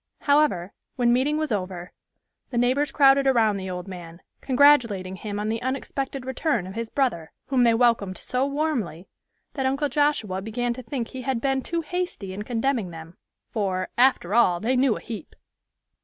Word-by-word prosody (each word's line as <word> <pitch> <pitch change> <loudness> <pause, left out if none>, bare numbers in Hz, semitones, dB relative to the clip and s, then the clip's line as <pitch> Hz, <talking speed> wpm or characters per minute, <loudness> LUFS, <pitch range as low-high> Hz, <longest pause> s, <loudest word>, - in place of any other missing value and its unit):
However, 285 - +2 0.2
when 240 -1 +3
meeting 275 +5 +2
was 310 -4 -2
over, 185 -3 -3 0.6
the 245 - -4
neighbors 260 +4 +2
crowded 275 -1 +5
around 225 -6 +3
the 190 -1 -5
old 180 +1 -5
man, 175 -3 -9 0.2
congratulating 245 -9 +3
him 205 +1 -5
on 210 - -2
the 225 +1 -2
unexpected 270 0 -3
return 260 - -1
of 190 - -8
his 230 +1 -4
brother, 235 - -1 0.2
whom 265 -2 +2
they 230 -1 +4
welcomed 225 -6 +2
so 250 +1 -1
warmly 280 - -2 0.5
that 265 -2 -1
Uncle 275 +2 0
Joshua 270 -10 0
began 240 +3 -2
to 255 - -8
think 240 0 -4
he 260 - -7
had 260 -2 -1
been 270 +1 0
too 335 +5 -2
hasty 340 - -4
in 200 - -5
condemning 230 -2 -1
them, 165 +1 -10 0.4
for 190 -4 -1
"after 245 -7 +3
all, 185 -7 +4
they 240 +6 0
knew 255 -3 +3
a - - -10
heap." 220 -7 -8
240 Hz, 175 wpm, -25 LUFS, 195-270 Hz, 0.6 s, crowded